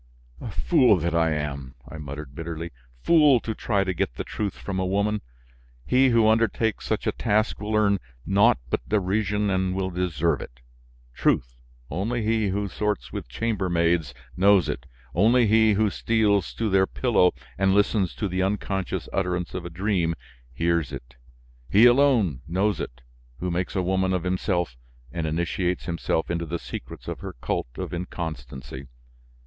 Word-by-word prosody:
"Fool 105 - +4
that 85 0 -1
I 85 -1 +3
am!" 70 -4 -4
I 80 - -9
muttered 70 -1 -7
bitterly, 85 +2 -5 0.3
"fool 150 -6 +6
to 110 - -3
try 100 -3 0
to 95 -1 -1
get 70 - -2
the - - -4
truth 100 -3 -4
from 95 -2 -4
a - - +1
woman! 100 +2 0 0.6
He 130 +1 +4
who 115 -2 +4
undertakes 110 0 +1
such - - -1
a - - +2
task 110 +2 0
will 105 +1 -2
earn 100 -2 +3 0.3
naught 105 +5 +4
but - - -2
derision 105 0 +1
and 95 0 0
will 95 -1 -1
deserve 85 -4 0
it! - - -11 0.5
Truth! - - +1 0.4
Only 110 +9 -1
he 110 -1 +1
who 100 +1 -1
sorts 105 +2 -2
with - - -5
chamber 100 - -1
maids 85 -6 +1 0.2
knows 95 -1 +5
it, - - -4 0.3
only 115 +7 +4
he 110 0 +4
who 105 0 +2
steals 105 -5 +1
to 115 - -1
their 95 -1 +3
pillow 115 -8 +3 0.3
and 95 0 +3
listens 100 - +2
to 100 - -2
the 95 0 -1
unconscious 95 -1 -2
utterance 90 -2 -1
of 90 -1 -5
a - - -5
dream, 85 -2 0 0.4
hears 85 +1 0
it. 65 -1 -9 0.5
He 105 +4 +6
alone 120 - +4
knows 95 +5 0
it, - - -6 0.4
who 90 0 -3
makes 90 +1 -2
a 95 - +1
woman 95 +1 +1
of 90 -2 -1
himself 90 - -1 0.3
and 80 -2 -3
initiates 85 +3 -1
himself 85 -1 -1
into 85 -1 -2
the 85 +2 -2
secrets - - -8
of - - -4
her - - -7
cult - - -2
of - - -5
inconstancy! 70 -7 -6
95 Hz, 165 wpm, -25 LUFS, 85-105 Hz, 0.6 s, fool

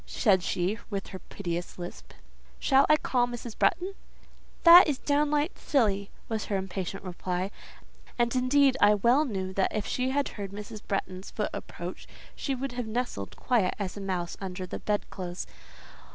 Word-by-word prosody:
said 195 -6 +3
she, 185 +5 -1
with 200 -2 -4
her 190 - -7
piteous 175 -3 -5
lisp. 175 0 -8 0.4
"Shall 270 0 +4
I 305 - +7
call 245 -4 +1
Mrs. 240 -2 -7
Bretton?" 375 +2 +1 0.7
"That 345 +2 +10
is 290 -3 0
downright 295 +3 +1
silly," 200 -7 +1 0.2
was 220 -2 -2
her 200 - -1
impatient 190 0 -4
reply; 185 +1 -3 0.7
and, 240 0 +1
indeed, 260 +1 +4
I 205 0 +7
well 240 +9 +4
knew 190 -6 -3
that 190 0 +1
if 215 - -1
she 255 +1 -1
had 280 +1 0
heard 200 -2 -7
Mrs. 210 +1 -7
Bretton's 190 -2 -3
foot - - -2
approach, - - -7 0.3
she 275 - -2
would 270 +1 -3
have 245 -2 -4
nestled 220 - -3
quiet 225 -8 +1
as 195 -3 -4
a 200 - -6
mouse 180 -3 -2
under 185 -1 -4
the 180 - -6
bedclothes. 185 -4 -3
210 Hz, 165 wpm, -28 LUFS, 190-255 Hz, 0.7 s, That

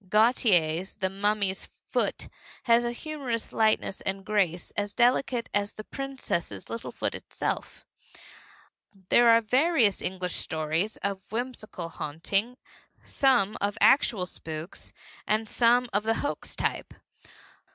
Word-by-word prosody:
Gautier's 190 -6 +3
The 190 -2 -2
Mummy's 200 -1 0 0.2
Foot - - 0 0.4
has 240 -2 +4
a 240 - 0
humor 290 +1 -6
of 230 -1 -2
a - - -12
lightness 215 -3 +1
and 195 0 -3
grace 185 -5 0
as 205 0 -2
delicate 245 0 +2
as 205 0 0
the 215 - -8
princess's 270 -10 -4
little 230 - -5
foot - - -2
itself. - - -4 1.2
There 240 -1 +6
are 230 0 +7
various 250 - +3
English 180 -1 -2
stories 160 +6 -1
of 200 -1 -2
whimsical 220 -7 -5
haunting, 195 +11 -2 0.5
some 245 -7 +2
of 200 0 0
actual 220 -8 +4
spooks 160 0 -8 0.4
and 220 +1 +1
some 245 +2 +3
of 205 - +2
the 225 +1 +1
hoax 290 - -4
type. - - -3
215 Hz, 130 wpm, -27 LUFS, 190-240 Hz, 1.2 s, are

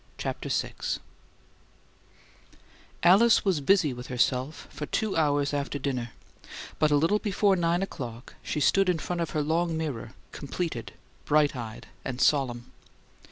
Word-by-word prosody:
CHAPTER - - -4
VI - - -1 2.3
Alice 205 +8 +6
was 185 -7 +2
busy 155 -2 +3
with 125 0 -8
herself 130 +3 -1
for 150 - -6
two 215 +4 -1
hours 145 -2 +2
after 145 0 -2
dinner; 130 -4 -2 0.7
but 155 - +4
a 145 - +3
little 165 +8 +3
before 200 -1 +2
nine 175 +1 +1
o'clock 125 -9 -7
she - - -3
stood 195 +6 +3
in 180 - +2
front 175 +2 -3
of 165 - -1
her 150 - +1
long 165 +2 0
mirror, 135 -8 -4 0.2
completed, 145 -5 -4 0.3
bright 150 -1 +3
eyed 115 -3 -7 0.2
and 130 -1 -4
solemn. 130 -5 +1
150 Hz, 140 wpm, -27 LUFS, 130-175 Hz, 2.3 s, Alice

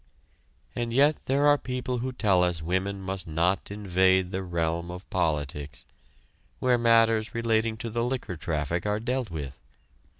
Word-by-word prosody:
And 120 -1 -2
yet 145 +5 +3
there 140 +2 +2
are 145 0 +5
people 125 -1 -3
who 130 +2 -3
tell 100 -7 +2
us 90 -2 0
women 95 +3 -1
must 95 -1 -4
not 85 +4 0
invade 95 -2 +2
the 95 0 -2
realm 85 -1 -2
of 90 +2 -8
politics, 75 -4 -2 0.7
where 125 -1 +2
matters 115 -1 +3
relating 115 -1 +1
to 115 - -5
the 115 +1 -1
liquor 125 -7 -3
traffic 80 +3 -2
are 105 +1 0
dealt 125 0 -2
with. 70 -5 -6
100 Hz, 155 wpm, -27 LUFS, 85-120 Hz, 0.7 s, are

